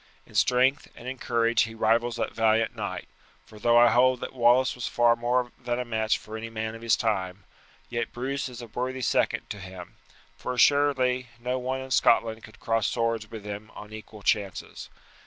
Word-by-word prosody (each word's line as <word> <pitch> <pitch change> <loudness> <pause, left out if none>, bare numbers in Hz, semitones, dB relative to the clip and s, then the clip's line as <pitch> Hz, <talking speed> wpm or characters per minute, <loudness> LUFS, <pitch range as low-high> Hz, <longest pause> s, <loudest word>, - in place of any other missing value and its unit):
In - - -19
strength 130 +3 +3
and 120 - -11
in 130 0 -5
courage 115 -1 +2
he 115 0 -2
rivals 115 +2 +2
that 120 - -3
valiant 110 0 +2
knight, - - -5 0.4
for 105 - -14
though 120 +2 +4
I 120 0 +7
hold 125 +1 +4
that - - -5
Wallace 125 +1 +4
was 125 - -4
far 120 -1 +3
more 120 +1 0
than 120 0 -1
a 125 - -2
match 110 -2 0
for 110 - -10
any 115 +1 -5
man 110 0 -4
of 115 - -10
his 115 -1 +3
time, 95 -4 -2 0.4
yet 120 -1 -3
Bruce 135 +3 -3
is 125 -1 -9
a - - -6
worthy 125 +3 -4
second - - +1
to 105 - -6
him, 95 -2 -10 0.4
for 125 - -4
assuredly 130 -2 +3
no 125 +2 -2
one 130 +1 -3
in 130 0 -9
Scotland 115 -2 +3
could 110 - -14
cross 115 -1 0
swords 115 -2 -1
with 110 -2 -9
him 105 +1 -6
on 105 +1 -10
equal 110 -1 -10
chances. 100 -3 -2
120 Hz, 195 wpm, -27 LUFS, 110-125 Hz, 0.4 s, I